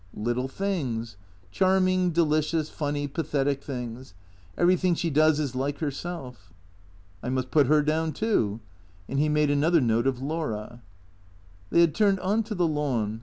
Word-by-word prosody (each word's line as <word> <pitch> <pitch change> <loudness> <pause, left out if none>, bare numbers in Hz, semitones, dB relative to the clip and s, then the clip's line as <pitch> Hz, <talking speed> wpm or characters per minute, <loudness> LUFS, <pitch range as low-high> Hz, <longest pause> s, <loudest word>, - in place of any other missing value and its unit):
Little 120 +4 -1
things. 135 - -3 0.4
Charming, 185 - +2
delicious, 155 -1 +1
funny, 145 -1 -2
pathetic 140 -2 -1
things. 125 -5 -7 0.4
Everything 180 0 +3
she 165 0 -2
does 155 +1 +4
is 140 -4 -2
like 140 +2 -2
herself." 135 - -6 0.4
" 90 0 -29
I 125 - -3
must 130 0 -2
put 145 -4 +4
her 150 +1 +4
down 160 +2 0
too." 115 - 0 0.5
And 135 - -2
he 150 +1 +2
made 150 -1 +2
another 160 +4 +3
note 115 -1 +1
of 130 -2 0
Laura. 125 -6 -4 0.9
They 170 - +4
had 165 -3 +4
turned 200 -3 +2
on 205 +4 +1
to 215 -1 -5
the 180 -2 +2
lawn. 125 -8 -1
145 Hz, 155 wpm, -26 LUFS, 125-165 Hz, 0.9 s, does